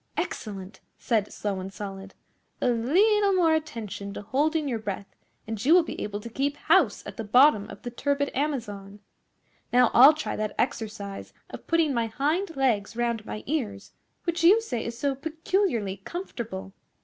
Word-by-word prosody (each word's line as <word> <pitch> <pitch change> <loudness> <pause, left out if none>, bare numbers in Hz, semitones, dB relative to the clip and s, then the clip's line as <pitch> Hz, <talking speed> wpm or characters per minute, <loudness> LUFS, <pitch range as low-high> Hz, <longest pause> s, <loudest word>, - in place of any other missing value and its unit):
'Excellent!' 195 -2 -5 0.2
said 215 -4 0
Slow 200 -2 -3
and 190 +1 -6
Solid. 195 -1 -8 0.4
'A - - +2
leetle 390 - +3
more 340 -4 +4
attention 215 -10 -4
to - - -6
holding 295 +7 0
your 235 -4 -1
breath 200 -2 -6 0.3
and 220 -1 -5
you 310 +6 +6
will 360 - +6
be - - -6
able 205 0 -3
to 235 - -8
keep 280 +5 -2
house - - +3
at - - -8
the 225 - -3
bottom 220 -1 +5
of 200 +1 -11
the 245 - -5
turbid 285 +3 -1
Amazon. 210 -8 -3 0.7
Now 250 -1 +5
I'll 270 +5 +9
try 315 - -3
that 215 -1 -3
exercise 215 -6 -3 0.2
of - - -10
putting 330 -3 +2
my 235 -2 0
hind 310 - -1
legs 230 -6 +1
round 235 -2 -1
my 215 - -6
ears 220 -9 -3 0.3
which 340 0 -1
you 390 +7 +7
say 245 - -3
is 235 0 -5
so 280 +2 0
peculiarly 310 - -1
comfortable. 195 - -6
235 Hz, 170 wpm, -26 LUFS, 205-305 Hz, 0.7 s, I'll